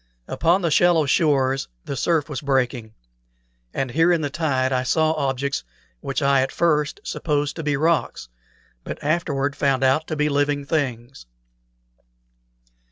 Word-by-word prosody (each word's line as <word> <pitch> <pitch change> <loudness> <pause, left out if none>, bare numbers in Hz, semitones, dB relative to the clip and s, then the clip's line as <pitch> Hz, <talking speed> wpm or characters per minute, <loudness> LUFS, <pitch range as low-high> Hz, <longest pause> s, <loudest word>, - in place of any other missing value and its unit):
Upon 175 +3 +1
the 170 - +1
shallow 170 -1 +4
shores 135 -2 +1 0.2
the 140 - -4
surf 155 +3 0
was 150 -4 -5
breaking; 125 -5 -1 0.8
and 130 -2 -3
here 165 +6 +3
in 170 -2 +2
the 145 -2 -3
tide 135 -4 0
I 125 - +1
saw 155 +5 +1
objects 140 -3 -2 0.4
which 135 - -3
I 140 -1 +4
at 130 - -1
first 150 -3 0
supposed 145 -2 -2
to - - -3
be 145 -2 0
rocks, 160 - 0 0.6
but - - -6
afterward 145 -3 -1
found 135 -2 +1
out 135 +4 +2
to 155 - -3
be 150 0 +1
living 145 0 0
things. 130 - -3
145 Hz, 150 wpm, -22 LUFS, 135-155 Hz, 0.8 s, shallow